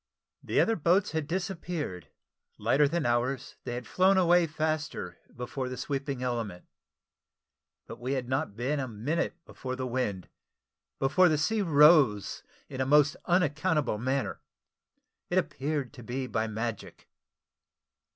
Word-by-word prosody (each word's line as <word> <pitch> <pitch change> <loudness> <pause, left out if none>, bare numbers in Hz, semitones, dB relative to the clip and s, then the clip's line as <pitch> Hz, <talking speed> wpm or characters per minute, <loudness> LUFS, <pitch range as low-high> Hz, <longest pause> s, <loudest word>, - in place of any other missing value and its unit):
The - - 0
other 225 - +3
boats 185 +4 +2
had 160 -2 -2
disappeared; 165 - -4 0.5
lighter 135 +7 +3
than 170 +2 -1
ours, 120 +3 -1
they 120 - -3
had 125 0 -5
flown 190 +1 +3
away 175 -1 +4
faster 155 - -3 0.2
before 125 +2 -4
the 130 - -6
sweeping 135 0 -3
element; 115 -8 -3 1.2
but 115 - -9
we 125 +3 -2
had 130 -3 -2
not 130 -4 -1
been 130 +6 -1
a 130 - -2
minute 125 +11 -2
before 130 -1 -6
the 130 0 -3
wind, 120 -7 -2 0.7
before 180 +7 +4
the 155 - +2
sea 215 +9 +1
rose 150 - +5 0.3
in 130 - -5
a - - +1
most 145 0 +5
unaccountable 155 - +1
manner 130 +3 -1 0.9
it - - 0
appeared 145 -1 -1
to 130 - -11
be 125 +3 -4
by 110 -2 -1
magic. 110 0 -5
135 Hz, 140 wpm, -29 LUFS, 120-160 Hz, 1.2 s, rose